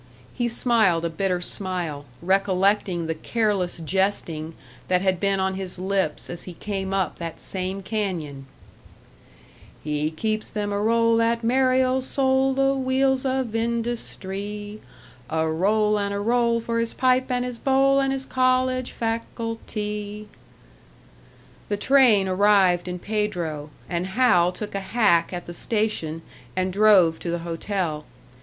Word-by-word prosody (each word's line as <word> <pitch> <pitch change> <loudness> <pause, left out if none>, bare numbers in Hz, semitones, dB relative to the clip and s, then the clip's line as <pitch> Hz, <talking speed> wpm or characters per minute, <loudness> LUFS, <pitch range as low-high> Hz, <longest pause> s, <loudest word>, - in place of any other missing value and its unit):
He 240 -1 -1
smiled 220 -8 +2
a 165 - -2
bitter 180 +1 -1
smile, 175 -6 0 0.2
recollecting 190 -1 +1
the 160 - -1
careless 200 0 -1
jesting 165 -2 -1 0.3
that 180 0 +2
had 190 -2 +1
been 195 0 +1
on 190 0 0
his 190 -1 -5
lips 190 -4 -1
as 175 - -5
he 180 - -9
came 195 0 -4
up 190 -4 -1
that 165 -1 -6
same 190 +1 -4
canyon: 175 -10 -3 1.4
"He 150 0 -1
keeps 215 +7 -1
them 205 -1 -3
a 200 - -1
roll, 230 +1 +3
that 230 0 +1
merry 255 +2 +3
old 260 0 0
soul 265 0 +2
The 270 0 +3
wheels 265 0 +1
of 260 -2 -1
industree; 210 -3 -4 0.5
A 160 0 0
roll 210 +6 +2
and 200 0 -1
a - - -2
roll, 235 +2 +2
for 230 0 -2
his 230 0 -2
pipe 255 0 +2
and 250 -1 0
his 245 -2 -6
bowl 275 0 +3
And 270 0 +1
his 270 0 -3
college 255 0 +1
facultee!" 215 -2 -4 1.4
The 205 - -1
train 235 -5 +4
arrived 190 -2 +3
in 180 0 -3
Pedro, 175 -8 -3 0.2
and 175 +1 -2
Hal 190 -5 +3
took 205 +3 -7
a 200 - -1
hack 195 -5 +2
at 175 -1 -5
the 175 - -8
station 175 -7 -2 0.3
and 185 0 -1
drove 195 -6 +5
to 175 - -5
the 170 0 -1
hotel. 165 -3 -3
205 Hz, 145 wpm, -24 LUFS, 180-235 Hz, 1.4 s, drove